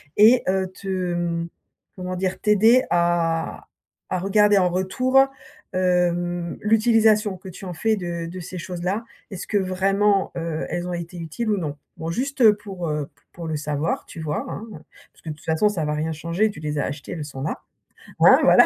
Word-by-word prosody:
et 230 Hz, +4 st, +6 dB
heu, 190 Hz, 0 st, +1 dB
te 185 Hz, +1 st, -12 dB
mmh, 175 Hz, -3 st, -1 dB, 0.5 s
comment 185 Hz, -1 st, -4 dB
dire? 185 Hz, +1 st, -2 dB
T'aider 220 Hz, +4 st, +5 dB
à 170 Hz, -1 st, +1 dB, 0.4 s
à 185 Hz, -, 0 dB
regarder 205 Hz, +2 st, +4 dB
en 180 Hz, -1 st, +3 dB
retour, 225 Hz, +9 st, +2 dB, 0.5 s
hem, 175 Hz, -1 st, 0 dB
l'utilisation 215 Hz, -2 st, +3 dB
que 185 Hz, +1 st, -10 dB
tu 185 Hz, +2 st, -10 dB
en 180 Hz, -, -5 dB
fais 220 Hz, +7 st, +1 dB
de 170 Hz, -3 st, -4 dB
de 180 Hz, +2 st, -7 dB
ces 180 Hz, +1 st, -7 dB
choses-là. 185 Hz, +5 st, -3 dB, 0.3 s
Est-ce 190 Hz, -, -6 dB
que 210 Hz, -, +1 dB
vraiment, 195 Hz, +1 st, +2 dB
heu, 165 Hz, -1 st, -3 dB
elles 175 Hz, +1 st, -3 dB
ont 180 Hz, -, -3 dB
été 170 Hz, +1 st, -6 dB
utiles 170 Hz, +8 st, -4 dB
ou 205 Hz, -, +2 dB
non? 155 Hz, -6 st, -3 dB, 0.2 s
Bon 165 Hz, +1 st, -4 dB
juste, 265 Hz, +8 st, -2 dB
heu, 215 Hz, -3 st, +7 dB
pour, 195 Hz, -4 st, -6 dB
heu, 150 Hz, -2 st, -2 dB
p 145 Hz, -2 st, -34 dB
pour 170 Hz, -1 st, -7 dB
le 160 Hz, -, -2 dB
savoir 150 Hz, +1 st, -2 dB
tu -, -, -10 dB
vois? 155 Hz, -1 st, -2 dB
Hein, 220 Hz, -, -6 dB
heu, -, -, -8 dB, 0.3 s
parce -, -, -24 dB
que 160 Hz, -, -6 dB
de -, -, -2 dB
toute -, -, -20 dB
façon 160 Hz, +6 st, +2 dB
ça 195 Hz, -6 st, -1 dB
va 150 Hz, 0 st, -1 dB
rien 155 Hz, +2 st, -1 dB
changer, 170 Hz, +7 st, 0 dB
tu 175 Hz, -, -11 dB
les 150 Hz, -1 st, -3 dB
as -, -, 0 dB
achetées 140 Hz, 0 st, -5 dB
elles 155 Hz, -3 st, -5 dB
sont 135 Hz, -2 st, -8 dB
là. 145 Hz, -, -3 dB, 0.6 s
Hein, -, -, +8 dB
voilà, -, -, +7 dB
180 Hz, 205 wpm, -23 LUFS, 165-205 Hz, 0.6 s, Hein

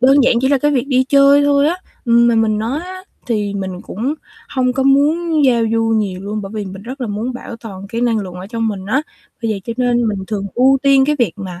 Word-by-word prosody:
đơn 265 Hz, +2 st, +5 dB
giản 250 Hz, -, +4 dB
chỉ 265 Hz, -, +1 dB
là 280 Hz, -1 st, +3 dB
cái 295 Hz, +3 st, +1 dB
việc 265 Hz, -2 st, 0 dB
đi 260 Hz, -1 st, +3 dB
chơi 280 Hz, +1 st, +5 dB
thôi 285 Hz, 0 st, +3 dB
á, 345 Hz, -, -1 dB, 0.3 s
ừm, 235 Hz, -1 st, +4 dB
mà 235 Hz, -, +3 dB
mình 220 Hz, -1 st, +2 dB
nói 235 Hz, +8 st, -2 dB
á 370 Hz, +1 st, -8 dB, 0.2 s
thì 210 Hz, -4 st, -1 dB
mình 190 Hz, -2 st, -4 dB
cũng 250 Hz, +9 st, -3 dB, 0.3 s
hông 255 Hz, -1 st, 0 dB
có 265 Hz, -, -1 dB
muốn 300 Hz, +3 st, +2 dB
giao 240 Hz, -3 st, +3 dB
du 225 Hz, 0 st, +1 dB
nhiều 195 Hz, -4 st, -2 dB
luôn 210 Hz, +2 st, -4 dB
bởi 195 Hz, -, -7 dB
vì 210 Hz, -1 st, -3 dB
mình 190 Hz, 0 st, -9 dB
rất 255 Hz, +5 st, -8 dB
là 245 Hz, -, -2 dB
muốn 215 Hz, +5 st, -3 dB
bảo 245 Hz, -1 st, -8 dB
toàn 200 Hz, -4 st, -9 dB
cái 230 Hz, +3 st, -3 dB
năng 235 Hz, -2 st, +1 dB
lượng 185 Hz, -3 st, -6 dB
ở 180 Hz, +1 st, -8 dB
trong 225 Hz, +1 st, -2 dB
mình 195 Hz, -3 st, -5 dB
á. 260 Hz, +8 st, +1 dB, 0.4 s
Bởi 225 Hz, -, 0 dB
vậy 200 Hz, -, -5 dB
cho 230 Hz, -, -3 dB
nên 240 Hz, -2 st, +1 dB
mình 205 Hz, -2 st, -2 dB
thường 200 Hz, -1 st, -3 dB
ưu 265 Hz, +2 st, +4 dB
tiên 275 Hz, -1 st, +5 dB
cái 300 Hz, +2 st, +1 dB
việc 240 Hz, -, +1 dB
mà 185 Hz, -3 st, -7 dB
235 Hz, 265 wpm, -17 LUFS, 210-275 Hz, 0.4 s, đơn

